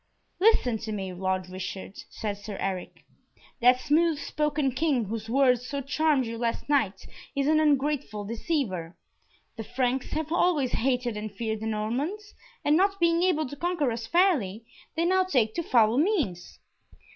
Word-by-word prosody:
"Listen 360 - +3
to 220 0 -5
me, 190 -3 -4
Lord 185 0 -2
Richard," 185 +1 -6
said 210 -2 -4
Sir 205 -1 -7
Eric: 190 -2 -4 0.5
"that 250 +1 +5
smooth 310 +3 +2
spoken 300 -2 -1
King 260 -3 +1
whose 220 +2 -5
words 250 -1 +3
so 280 +1 -3
charmed 280 0 +1
you 230 0 -5
last 235 -1 -2
night 220 -10 +1 0.3
is 280 0 +1
an 310 +1 +4
ungrateful 285 -7 +1
deceiver. 215 - -3 0.6
The 225 - -4
Franks 250 +2 -1
have 310 0 -2
always 325 -7 +2
hated 245 -3 0
and 210 0 -5
feared 220 +1 -3
the 220 - -4
Normans, 270 - -3 0.3
and 295 - +4
not 395 +3 +2
being 335 0 +3
able 345 -5 +2
to 285 - -8
conquer 335 -4 0
us 225 0 -5
fairly, 255 - +2 0.3
they 330 +1 +1
now 375 +1 +3
take 245 -12 +1
to - - -1
foul 235 -5 +3
means. 290 - -1
255 Hz, 160 wpm, -27 LUFS, 220-310 Hz, 0.6 s, that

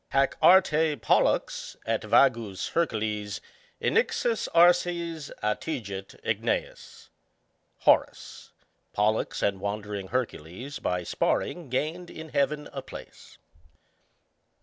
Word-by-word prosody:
Hac 135 0 +2
Arte 160 -5 +5
Pollux 125 - +1
et 115 -1 0
vagus 115 -3 +2
Hercules 105 -9 -1 0.4
Innixus 245 - +1
arces 170 -2 +3
attigit 105 -4 -4
igueas. - - -1
ŌĆö - - -16 0.7
Horace. - - +1 0.4
Pollux 105 +2 0
and 100 -1 +1
wandering 100 -1 -4
Hercules 125 - -4
by 90 0 -1
sparring 165 - -1
gained 160 +7 -2
in 160 0 -9
heaven 150 +1 0
a - - -4
place. - - -12
130 Hz, 95 wpm, -27 LUFS, 105-160 Hz, 0.7 s, Arte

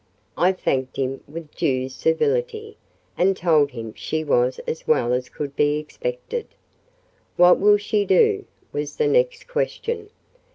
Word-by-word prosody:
I 180 +2 +3
thanked 130 -8 -2
him 135 0 -2
with 155 +1 -9
due 130 -2 0
civility, 455 - -1 0.4
and 190 +1 +3
told 155 -4 +3
him 115 -5 -7
she 155 0 -3
was 125 -3 +2
as 160 - -5
well 125 -5 +2
as 125 0 -2
could 140 -1 -6
be 145 0 +2
expected. 485 - -5 0.9
"What 180 0 +6
will 205 +1 +6
she 205 0 0
do?" 420 - +3 0.3
was - - -3
the 460 - +1
next - - +1
question. 460 -3 -3
180 Hz, 140 wpm, -23 LUFS, -, 0.9 s, What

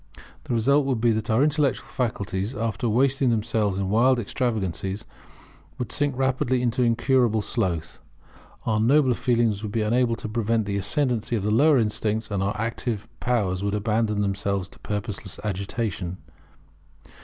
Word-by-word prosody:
The - - -2
result 140 +5 +3
would 130 -4 0
be 115 +1 +3
that 110 -1 -2
our 110 +5 +4
intellectual 150 -3 +1
faculties, 100 -2 -2
after 115 +1 -1
wasting 130 +3 +2
themselves 110 -3 0
in 95 -1 -1
wild 125 +4 +4
extravagancies, 105 -3 -2 0.7
would 125 -3 -4
sink 145 -3 0
rapidly 130 -1 +1
into 125 +1 +1
incurable 120 -2 +2
sloth; 85 -10 -2 0.7
our 110 -1 +1
nobler 130 +3 +4
feelings 115 -4 +1
would 105 -2 -4
be 110 +1 0
unable 115 +2 +2
to 110 - -7
prevent 110 0 0
the 100 0 -2
ascendancy 120 +3 0
of 105 - -2
the 105 - 0
lower 145 +6 +5
instincts; 105 -1 -1
and 100 -2 0
our 100 +2 -1
active 115 -1 -2
powers 100 -6 0
would 100 0 0
abandon 105 0 0
themselves 100 -1 -1
to - - -18
purposeless 105 -2 -5
agitation. 100 -2 -3
110 Hz, 155 wpm, -25 LUFS, 100-125 Hz, 0.7 s, lower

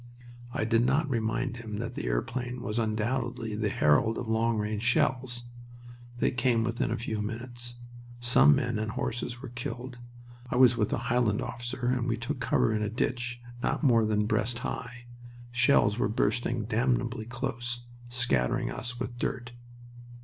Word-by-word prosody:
I 110 - -1
did 115 +1 +3
not 140 +5 +2
remind 120 0 -1
him 110 -3 -6
that 115 +2 -4
the 60 - -4
airplane 120 - -2
was 105 +2 -1
undoubtedly 115 +1 -1
the 105 0 0
herald 75 +8 +3
of 125 - -4
long 110 +1 +2
range 105 0 -1
shells. 120 +1 +1 0.7
They - - +2
came 120 -3 +2
within 115 +1 0
a - - 0
few 110 -2 -3
minutes. 120 +2 -5 0.4
Some 120 - +6
men 115 -2 0
and 110 0 -2
horses 120 +1 -3
were 130 - -5
killed. 120 +1 -6 0.5
I - - -1
was 125 -1 +7
with 105 -3 0
a - - +1
Highland 120 -4 +3
officer 120 +1 -4
and 125 0 +1
we 115 - +1
took 115 +3 -3
cover 115 -2 +2
in 105 - 0
a 105 - 0
ditch 120 +1 -2 0.2
not - - 0
more 115 -5 +5
than 105 -1 +2
breast 115 +2 0
high. 120 0 -5 0.5
Shells 120 -3 +4
were 100 - +2
bursting 120 +1 0
damnably 120 0 0
close, 120 -1 -4 0.2
scattering 120 - +1
us 125 +1 -5
with 120 -1 -4
dirt. 125 -1 -2
120 Hz, 165 wpm, -29 LUFS, 110-125 Hz, 0.7 s, was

